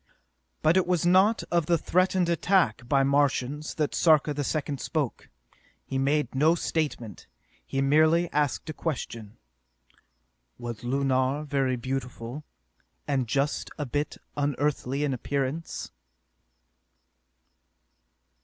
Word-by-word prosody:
But 160 +4 +4
it 185 - +2
was 180 -2 +1
not 190 +5 +4
of 170 -3 +1
the 170 - +3
threatened 185 +2 +1
attack 170 - +1
by 140 -1 +4
Martians 140 +1 0
that 150 -2 -1
Sarka 155 -3 +4
the 145 0 -2
Second 145 -2 -2
spoke. 150 -7 -3 0.6
He 135 - -2
made 140 -1 +1
no 155 +5 +4
statement. 145 - -3 0.4
He 135 0 -2
merely 155 +4 +4
asked 145 -2 0
a 155 - -4
question: 115 -9 -5 1.2
"Was 120 -1 -7
Lunar 135 +2 +1
very 135 -3 0
beautiful, 130 +1 -5 0.6
and 135 -4 0
just 140 +4 -1
a 150 - -2
bit 145 +3 -2 0.2
unearthly 145 -1 -1
in 145 -2 0
appearance?" 140 +5 -3
145 Hz, 115 wpm, -27 LUFS, 130-155 Hz, 1.2 s, But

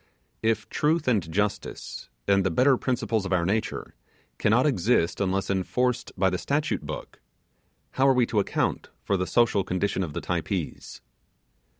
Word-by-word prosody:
If 110 -2 0
truth 155 +1 0
and 100 -10 +1
justice, 100 +4 -3 0.2
and 100 -1 +4
the 95 - +1
better 130 +10 +4
principles 120 -4 -1
of 95 - -5
our 90 -2 +2
nature, 105 +4 -2 0.5
cannot 115 +6 +3
exist 100 - +2
unless 95 0 0
enforced 125 +6 0
by 95 0 +3
the 90 - -1
statute 145 +2 -1
book, 75 +1 -8 0.7
how 135 +1 +2
are 135 - +6
we 125 -1 +4
to 110 - 0
account 100 - -1
for 100 - +1
the 90 -1 -1
social 115 -5 +3
condition 95 +1 -1
of 80 -4 -5
the - - -3
Typees? - - -3
105 Hz, 160 wpm, -26 LUFS, 95-125 Hz, 0.7 s, are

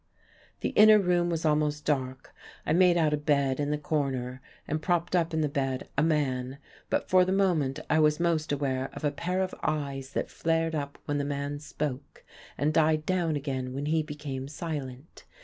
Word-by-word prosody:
The - - 0
inner 215 0 +7
room 175 -3 +2
was 165 -1 -2
almost 150 -1 +1
dark. 130 -3 -2 0.3
I - - +1
made 180 0 +5
out 155 -3 +2
a - - +2
bed 140 -3 +1
in 145 0 0
the 150 - 0
corner, 135 -4 -2 0.3
and 155 +1 -2
propped 175 +1 0
up 170 -1 +2
in 160 -1 0
the 150 - +2
bed 135 -2 -2
a 140 - +2
man; 135 -4 0 0.3
but - - 0
for 185 0 +5
the 185 - -1
moment 175 -9 +1
I 155 - +3
was 150 0 +3
most 165 -3 +1
aware 135 -2 -1
of - - -9
a 145 - +2
pair 180 +6 -1
of 185 - -4
eyes 140 -3 -3
that - - -2
flared 165 0 0
up 145 -2 -3
when 145 0 -1
the - - 0
man 140 0 -3
spoke, 145 -2 -5 0.3
and 150 +3 +1
died 155 -1 +3
down 175 -3 +1
again 130 -3 -3
when 140 +1 -3
he 160 +1 +2
became 145 -3 -6
silent. 145 -2 -6
150 Hz, 195 wpm, -28 LUFS, 140-165 Hz, 0.3 s, inner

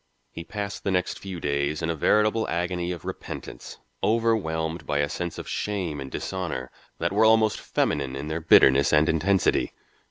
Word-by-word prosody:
He 85 - -7
passed 100 +3 -5
the - - -1
next 90 -1 -1
few 95 -3 -6
days 70 +1 -1
in 80 - 0
a - - -2
veritable 105 +7 +2
agony 90 +1 -1
of 85 - -7
repentance, - - -7 0.3
overwhelmed 85 -8 0
by 75 - 0
a 75 0 +2
sense 85 +1 -4
of - - -7
shame 95 -8 -3
and 65 - -6
dishonour 85 -7 -4 0.3
that 85 - -1
were 105 +2 +4
almost 110 -1 +4
feminine 70 -2 -1
in 70 +2 -5
their 80 +2 -3
bitterness 70 -3 +6
and 75 0 +4
intensity. 85 +3 +2
85 Hz, 170 wpm, -25 LUFS, 75-100 Hz, 0.3 s, bitterness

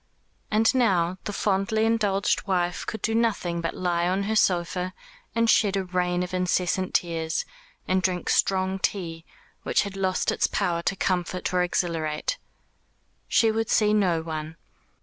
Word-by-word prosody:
And 220 +3 +3
now 185 -8 +2
the - - -2
fondly 205 +2 +1
indulged 210 -3 +1
wife 180 -2 -1
could 220 - -5
do 225 - +1
nothing 205 -7 0
but 165 - -3
lie 175 -1 0
on 190 +2 0
her 220 +2 -1
sofa 180 -1 +1 0.4
and 230 0 +2
shed 205 -3 +3
a 195 - 0
rain 180 0 0
of 180 - -6
incessant 180 0 0
tears, 165 -2 0 0.4
and 185 0 +2
drink 185 -1 -1
strong 190 0 +1
tea, 165 -5 -3 0.4
which - - +1
had 200 -1 -6
lost 190 -1 0
its - - +1
power 175 -4 -1
to 195 - -1
comfort 180 -1 -1
or 180 - +3
exhilarate. 170 - -1 0.9
She 225 -1 +3
would 225 0 -1
see 210 -1 +3
no 180 -6 +2
one. 155 -1 -5
185 Hz, 155 wpm, -25 LUFS, 175-205 Hz, 0.9 s, And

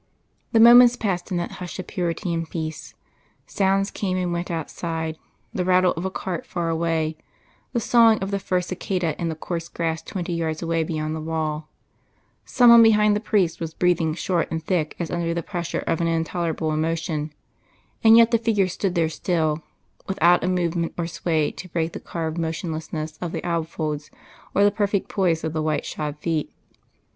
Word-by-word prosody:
The 225 - +4
moments 240 +1 +9
passed 195 -6 -2
in 180 - -1
that 175 - -3
hush 180 - -6
of 185 - -5
purity 175 -1 -2
and 165 -1 -3
peace; 160 -2 -5 0.5
sounds 195 0 +1
came 185 -2 -2
and 180 -1 -1
went 175 +1 -3
outside, 160 -1 -3 0.4
the 180 - -1
rattle 185 0 +4
of 170 +3 -4
a - - 0
cart 185 -2 -4
far 170 -2 -3
away, 160 -1 0 0.5
the 240 - 0
sawing 230 -1 +5
of 195 0 -4
the 200 - 0
first 180 -2 -1
cicada 180 -3 -2
in 170 - 0
the 160 - -3
coarse 170 +1 -5
grass 165 -1 -2
twenty 175 -3 -4
yards 160 -1 -2
away 165 -1 0
beyond 155 -1 -3
the 160 - -5
wall; 155 -1 -3 0.8
some 245 -2 +5
one 235 0 +9
behind 210 -2 +5
the - - 0
priest 195 -6 +1
was 165 -1 -5
breathing 170 -3 +1
short 175 -1 -1
and 160 0 -3
thick 165 -4 -1
as 170 - -4
under 170 -1 -1
the 170 - -2
pressure 175 -2 -3
of 165 - 0
an 170 - +1
intolerable 165 -1 -1
emotion, 155 -1 -1 0.7
and 225 0 +8
yet 230 0 +6
the 230 - +3
figure 215 -4 +2
stood 185 +1 -2
there 165 -2 +2
still, 160 -2 -1 0.5
without 175 -2 +3
a - - 0
movement 175 -2 -1
or 170 - -1
sway 160 -2 0
to 185 - -10
break 165 -1 -1
the - - -5
carved 165 -1 -4
motionlessness 160 -1 -4
of 175 -2 -3
the - - -4
alb 165 -2 -1
folds 150 -2 -4 0.5
or 200 - +4
the 205 - +5
perfect 200 -1 -1
poise 175 -5 +1
of 160 -1 -2
the 155 - -1
white 155 -1 -1
shod 150 -1 -4
feet. 160 -1 -2
170 Hz, 190 wpm, -23 LUFS, 160-185 Hz, 0.8 s, moments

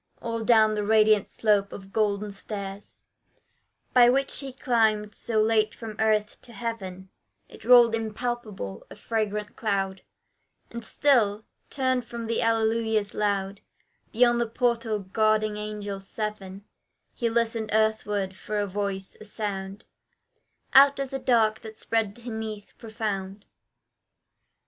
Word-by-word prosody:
All 230 -1 -3
down 220 -2 +5
the 210 -1 -1
radiant 215 -1 +4
slope 205 -2 +1
of 195 -1 -10
golden 210 -1 0
stairs, 200 0 -8 0.9
By 245 -1 +7
which 270 +2 0
he 275 -2 -5
climbed 220 -5 +1
so 225 -2 -1
late 215 0 +2
from 225 -2 -8
earth 215 -1 +1
to 240 - -14
heaven, 195 -4 -6 0.4
It - - -15
rolled 240 0 +7
impalpable 220 - -4
a - - -11
fragrant 210 -2 -3
cloud; 195 -3 -1 0.7
And 235 0 -7
still, 220 -5 +2 0.2
turned 260 -2 0
from 235 -1 -6
the 225 0 -1
Alleluias 225 -2 +1
loud, 200 -1 -1 0.5
Beyond 240 +1 +3
the 235 - 0
portal 230 -2 0
guarding 215 +2 +1
angels 205 -2 -6
seven, 205 -2 -5 0.5
He 235 -3 -1
listened 225 -1 0
earthward, 210 -3 0
for 210 +2 -5
a 205 - +1
voice 195 -1 -4
a - - -9
sound 200 -2 -5 0.9
Out 275 +1 +7
of 275 -1 -3
the 270 - -3
dark 225 -4 +2
that 220 -2 -10
spread 220 -3 -1
beneath 220 -3 -6
profound. 205 -3 -4
215 Hz, 130 wpm, -26 LUFS, 205-230 Hz, 0.9 s, By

